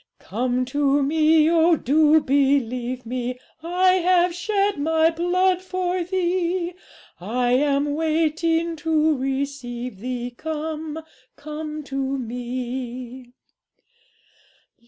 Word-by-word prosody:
'"Come 250 Hz, +4 st, -2 dB
to 285 Hz, +1 st, +1 dB
Me 310 Hz, +2 st, +4 dB
oh, 335 Hz, 0 st, +4 dB
do 305 Hz, +3 st, +4 dB
believe 255 Hz, -3 st, 0 dB
Me! 250 Hz, +1 st, -3 dB, 0.2 s
I 360 Hz, +3 st, +3 dB
have 360 Hz, 0 st, +3 dB
shed 395 Hz, 0 st, 0 dB
My 320 Hz, +2 st, +3 dB
blood 360 Hz, +2 st, +1 dB
for 370 Hz, -1 st, -2 dB
thee; 355 Hz, 0 st, -1 dB, 0.5 s
I 245 Hz, +7 st, -1 dB
am 285 Hz, +2 st, +2 dB
waiting 325 Hz, +1 st, 0 dB
to 315 Hz, 0 st, +2 dB
receive 260 Hz, -4 st, -4 dB
thee, 245 Hz, +1 st, -4 dB
Come, 315 Hz, +1 st, -5 dB, 0.3 s
come 305 Hz, 0 st, -6 dB
to 275 Hz, -1 st, -2 dB
Me." 245 Hz, 0 st, -6 dB
300 Hz, 95 wpm, -23 LUFS, 255-330 Hz, 0.5 s, Me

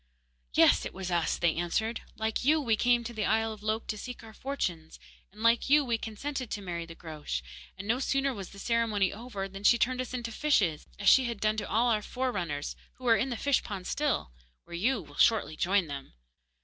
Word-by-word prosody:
'Yes, -, -, +6 dB
it -, -, -6 dB
was 185 Hz, -1 st, -4 dB
us,' 170 Hz, -3 st, +1 dB
they 170 Hz, -2 st, +2 dB
answered. 220 Hz, +7 st, -1 dB, 0.2 s
'Like 220 Hz, +1 st, -1 dB
you, 305 Hz, +4 st, +4 dB
we 235 Hz, -7 st, +2 dB
came 240 Hz, +1 st, +3 dB
to 235 Hz, +1 st, -6 dB
the 215 Hz, -2 st, -2 dB
isle 225 Hz, 0 st, +1 dB
of 215 Hz, -, -12 dB
Lok 215 Hz, +1 st, -1 dB
to 215 Hz, -, -4 dB
seek 250 Hz, 0 st, -7 dB
our 220 Hz, -1 st, -11 dB
fortunes, 180 Hz, -, -4 dB, 0.3 s
and 210 Hz, +3 st, -10 dB
like 230 Hz, +3 st, +3 dB
you 295 Hz, 0 st, +6 dB
we 235 Hz, -2 st, 0 dB
consented 255 Hz, +3 st, -4 dB
to -, -, -3 dB
marry 170 Hz, -4 st, -5 dB
the 165 Hz, -, -10 dB
Groac'h, 150 Hz, -, -5 dB, 0.3 s
and 195 Hz, +2 st, -7 dB
no 235 Hz, +3 st, +2 dB
sooner 275 Hz, 0 st, +1 dB
was 195 Hz, -5 st, -7 dB
the 200 Hz, -, -13 dB
ceremony 215 Hz, -3 st, +1 dB
over 205 Hz, -3 st, -5 dB
than 195 Hz, +1 st, -10 dB
she 235 Hz, -, +6 dB
turned 255 Hz, +2 st, +1 dB
us 255 Hz, -, -6 dB
into 235 Hz, -2 st, -4 dB
fishes, 210 Hz, -, +1 dB
as 200 Hz, -, -3 dB
she 265 Hz, -, +7 dB
had 235 Hz, -3 st, -3 dB
done 215 Hz, +1 st, +1 dB
to 215 Hz, -, -3 dB
all 235 Hz, +4 st, +3 dB
our 215 Hz, -2 st, +2 dB
forerunners, 185 Hz, -, -3 dB, 0.2 s
who 255 Hz, -, -13 dB
are 230 Hz, -2 st, +6 dB
in 235 Hz, +5 st, 0 dB
the 240 Hz, -, -3 dB
fish 280 Hz, +1 st, +2 dB
pond 195 Hz, -4 st, -6 dB
still, 285 Hz, -, -1 dB, 0.3 s
where -, -, -13 dB
you 225 Hz, +8 st, +1 dB
will 145 Hz, -1 st, -15 dB
shortly 220 Hz, -8 st, +3 dB
join 185 Hz, +3 st, +2 dB
them. 140 Hz, -, -7 dB
220 Hz, 225 wpm, -30 LUFS, 190-245 Hz, 0.3 s, she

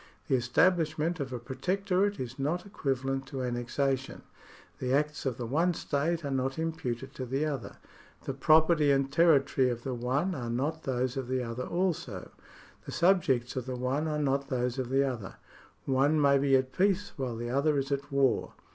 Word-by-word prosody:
The -, -, +4 dB
establishment 160 Hz, +5 st, +2 dB
of 135 Hz, -2 st, -3 dB
a 125 Hz, -, -3 dB
pro 125 Hz, +3 st, -8 dB
tectorate 195 Hz, +5 st, 0 dB
is 130 Hz, +1 st, -6 dB
not 160 Hz, +8 st, -1 dB
equivalent 135 Hz, -7 st, -2 dB
to 135 Hz, -1 st, -4 dB
annexation. 130 Hz, +2 st, -2 dB, 0.6 s
The 130 Hz, 0 st, -1 dB
acts 150 Hz, 0 st, 0 dB
of 125 Hz, -3 st, -2 dB
the 120 Hz, -, -4 dB
one 165 Hz, +8 st, +1 dB
state 155 Hz, +3 st, -1 dB
are 140 Hz, -, -2 dB
not 135 Hz, 0 st, -1 dB
imputed 160 Hz, -6 st, -3 dB
to 130 Hz, -, -5 dB
the 135 Hz, +5 st, 0 dB
other; 140 Hz, -5 st, -4 dB, 0.5 s
the 135 Hz, -, -3 dB
property 155 Hz, +2 st, +4 dB
and 135 Hz, -1 st, +2 dB
territory 140 Hz, -5 st, +4 dB
of 120 Hz, -1 st, -4 dB
the 130 Hz, -, -3 dB
one 130 Hz, +10 st, 0 dB
are 120 Hz, -7 st, -4 dB
not 145 Hz, +7 st, -2 dB
those 130 Hz, 0 st, -1 dB
of 130 Hz, -2 st, -3 dB
the 130 Hz, 0 st, -1 dB
other 115 Hz, +2 st, -4 dB
also; 180 Hz, -1 st, -2 dB, 0.6 s
the -, -, -5 dB
subjects 165 Hz, -10 st, +2 dB
of 130 Hz, -1 st, -3 dB
the 130 Hz, -, -3 dB
one 130 Hz, +5 st, -1 dB
are 150 Hz, -1 st, -1 dB
not 140 Hz, -2 st, 0 dB
those 125 Hz, 0 st, -1 dB
of 125 Hz, -2 st, -2 dB
the 135 Hz, +1 st, +3 dB
other; 120 Hz, -8 st, -4 dB, 0.5 s
one 140 Hz, +3 st, +3 dB
may 140 Hz, -1 st, +4 dB
be 135 Hz, -1 st, +3 dB
at 130 Hz, 0 st, +1 dB
peace 200 Hz, +1 st, +1 dB
while 130 Hz, -4 st, -3 dB
the 120 Hz, +1 st, -4 dB
other 145 Hz, +3 st, +2 dB
is 135 Hz, 0 st, -2 dB
at 140 Hz, +1 st, -2 dB
war. 135 Hz, -3 st, +1 dB
135 Hz, 190 wpm, -29 LUFS, 130-155 Hz, 0.6 s, The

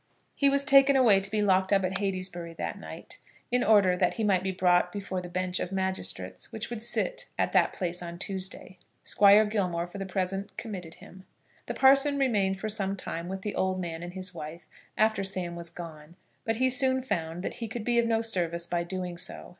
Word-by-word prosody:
He 280 Hz, -, +3 dB
was 280 Hz, 0 st, +2 dB
taken 275 Hz, 0 st, +6 dB
away 230 Hz, -7 st, +6 dB
to 195 Hz, 0 st, -5 dB
be 210 Hz, 0 st, 0 dB
locked 190 Hz, -1 st, +2 dB
up 195 Hz, -2 st, +3 dB
at 190 Hz, +1 st, -1 dB
Heytesbury 185 Hz, -4 st, -3 dB
that 85 Hz, -, -4 dB
night, 80 Hz, 0 st, -8 dB, 0.3 s
in 250 Hz, 0 st, +3 dB
order 200 Hz, -4 st, +5 dB
that 180 Hz, -1 st, +1 dB
he 225 Hz, -, -2 dB
might 195 Hz, -4 st, +3 dB
be 190 Hz, 0 st, -1 dB
brought 180 Hz, -1 st, +3 dB
before 190 Hz, -2 st, -4 dB
the 175 Hz, -, -8 dB
bench 185 Hz, 0 st, -1 dB
of 180 Hz, -, -3 dB
magistrates 190 Hz, 0 st, -3 dB
which -, -, -5 dB
would 235 Hz, -2 st, -4 dB
sit 370 Hz, -, -1 dB
at -, -, +1 dB
that -, -, +4 dB
place 180 Hz, -2 st, -3 dB
on 170 Hz, -1 st, -7 dB
Tuesday. 190 Hz, 0 st, -5 dB, 0.2 s
Squire 205 Hz, +1 st, +6 dB
Gilmore 185 Hz, -5 st, -1 dB
for 180 Hz, +3 st, -9 dB
the 195 Hz, -, -4 dB
present 195 Hz, +1 st, -3 dB
committed 185 Hz, -8 st, -6 dB
him. 190 Hz, 0 st, -14 dB, 0.4 s
The -, -, -3 dB
parson 275 Hz, +2 st, +5 dB
remained 205 Hz, -8 st, +1 dB
for 215 Hz, -, -3 dB
some 200 Hz, -2 st, -1 dB
time 170 Hz, -3 st, -5 dB
with 190 Hz, +1 st, -5 dB
the 210 Hz, -, -3 dB
old 190 Hz, 0 st, 0 dB
man 170 Hz, -2 st, -4 dB
and 175 Hz, 0 st, -7 dB
his 185 Hz, 0 st, -4 dB
wife 160 Hz, 0 st, -8 dB, 0.3 s
after 220 Hz, -2 st, +2 dB
Sam 185 Hz, -3 st, -3 dB
was 170 Hz, -1 st, -5 dB
gone, 165 Hz, -1 st, -10 dB, 0.3 s
but 225 Hz, -, 0 dB
he 260 Hz, +3 st, +2 dB
soon 260 Hz, 0 st, +2 dB
found 170 Hz, -7 st, -3 dB
that -, -, -4 dB
he 230 Hz, -, -2 dB
could 225 Hz, +1 st, -5 dB
be 240 Hz, +1 st, +2 dB
of 235 Hz, -, +2 dB
no 225 Hz, 0 st, +1 dB
service 170 Hz, -6 st, 0 dB
by 170 Hz, 0 st, -1 dB
doing 180 Hz, -1 st, -5 dB
so. 185 Hz, -, -6 dB
190 Hz, 215 wpm, -28 LUFS, 175-215 Hz, 0.4 s, taken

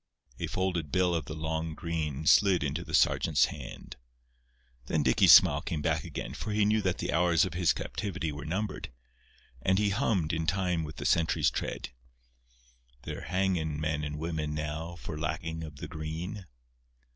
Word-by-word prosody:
A -, -, -2 dB
folded 90 Hz, -5 st, -2 dB
bill 90 Hz, -1 st, +2 dB
of 80 Hz, -4 st, -1 dB
the 75 Hz, -, -6 dB
"long 80 Hz, 0 st, -3 dB
green" 80 Hz, -4 st, -3 dB
slid 95 Hz, -2 st, +5 dB
into 75 Hz, +4 st, -2 dB
the -, -, -2 dB
sergeant's 75 Hz, -3 st, +4 dB
hand. -, -, -9 dB, 0.9 s
Then 75 Hz, +2 st, +1 dB
Dicky's 65 Hz, -2 st, +5 dB
smile -, -, +8 dB
came 75 Hz, -3 st, -3 dB
back 80 Hz, -1 st, +1 dB
again, 65 Hz, -, -6 dB
for 105 Hz, +8 st, -4 dB
he 105 Hz, 0 st, +3 dB
knew 110 Hz, +1 st, +2 dB
that 95 Hz, -3 st, 0 dB
the -, -, -2 dB
hours 85 Hz, 0 st, +4 dB
of 90 Hz, -, -5 dB
his 85 Hz, -1 st, +3 dB
captivity 90 Hz, -6 st, -3 dB
were 75 Hz, 0 st, -7 dB
numbered; 95 Hz, -, -3 dB, 0.7 s
and 95 Hz, +8 st, +2 dB
he 100 Hz, 0 st, +2 dB
hummed, 100 Hz, -, +1 dB
in 80 Hz, 0 st, -1 dB
time 90 Hz, -2 st, 0 dB
with 75 Hz, -1 st, -7 dB
the -, -, -6 dB
sentry's 80 Hz, -1 st, +2 dB
tread: -, -, -4 dB, 1.1 s
"They're -, -, -6 dB
hanging 90 Hz, -5 st, 0 dB
men 75 Hz, -1 st, -1 dB
and 75 Hz, 0 st, -4 dB
women 75 Hz, -2 st, -3 dB
now, 80 Hz, +3 st, -4 dB
For 80 Hz, -3 st, -7 dB
lacking 80 Hz, +1 st, -3 dB
of 75 Hz, -2 st, -8 dB
the -, -, -7 dB
green." 85 Hz, +6 st, -6 dB
80 Hz, 170 wpm, -30 LUFS, 75-90 Hz, 1.1 s, smile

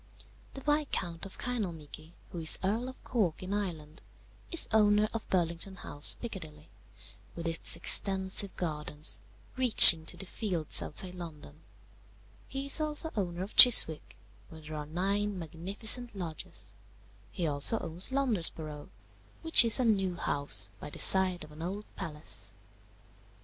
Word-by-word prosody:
"The 270 Hz, -, -9 dB
Viscount 270 Hz, -, -4 dB
of 195 Hz, -, -16 dB
Kinalmeaky, 170 Hz, -, -8 dB, 0.2 s
who 175 Hz, -, -8 dB
is 160 Hz, -1 st, +6 dB
Earl 225 Hz, +6 st, -3 dB
of 260 Hz, -, -16 dB
Cork, 190 Hz, -9 st, -4 dB
in 185 Hz, +2 st, -7 dB
Ireland, 165 Hz, -7 st, -7 dB, 0.5 s
is 335 Hz, -, +4 dB
owner 210 Hz, -1 st, +1 dB
of 230 Hz, -, -8 dB
Burlington 175 Hz, +1 st, -3 dB
House, 145 Hz, -6 st, +3 dB
Piccadilly, 160 Hz, -10 st, -10 dB, 0.7 s
with 170 Hz, -, -9 dB
its 165 Hz, 0 st, +2 dB
extensive 190 Hz, +2 st, +1 dB
gardens, 150 Hz, -2 st, -3 dB, 0.4 s
reaching 215 Hz, -10 st, +8 dB
to -, -, -5 dB
the 195 Hz, -, -9 dB
fields 180 Hz, -6 st, -2 dB
outside 180 Hz, +4 st, -4 dB
London; 155 Hz, -4 st, -13 dB, 0.9 s
he 270 Hz, 0 st, -7 dB
is 280 Hz, +3 st, +5 dB
also 305 Hz, +1 st, -4 dB
owner 180 Hz, -3 st, -5 dB
of 200 Hz, -, -12 dB
Chiswick, 190 Hz, -11 st, +6 dB, 0.3 s
where 160 Hz, -, -15 dB
there 155 Hz, 0 st, -12 dB
are 150 Hz, -1 st, -8 dB
nine 200 Hz, +5 st, -4 dB
magnificent 200 Hz, +8 st, 0 dB
lodges; 155 Hz, -, -8 dB, 0.5 s
he 180 Hz, -3 st, -6 dB
also 145 Hz, +8 st, +2 dB
owns 175 Hz, +4 st, -3 dB
Londesborough, 165 Hz, -, -1 dB, 0.5 s
which 325 Hz, -5 st, +5 dB
is 230 Hz, +2 st, +2 dB
a 255 Hz, -, -1 dB
new 195 Hz, -5 st, -1 dB
house 125 Hz, -, -2 dB
by -, -, -10 dB
the -, -, -13 dB
side 185 Hz, -2 st, +1 dB
of 155 Hz, -, -15 dB
an 150 Hz, +1 st, -14 dB
old 195 Hz, +5 st, -7 dB
palace. 150 Hz, -, -6 dB
180 Hz, 140 wpm, -28 LUFS, 155-210 Hz, 0.9 s, reaching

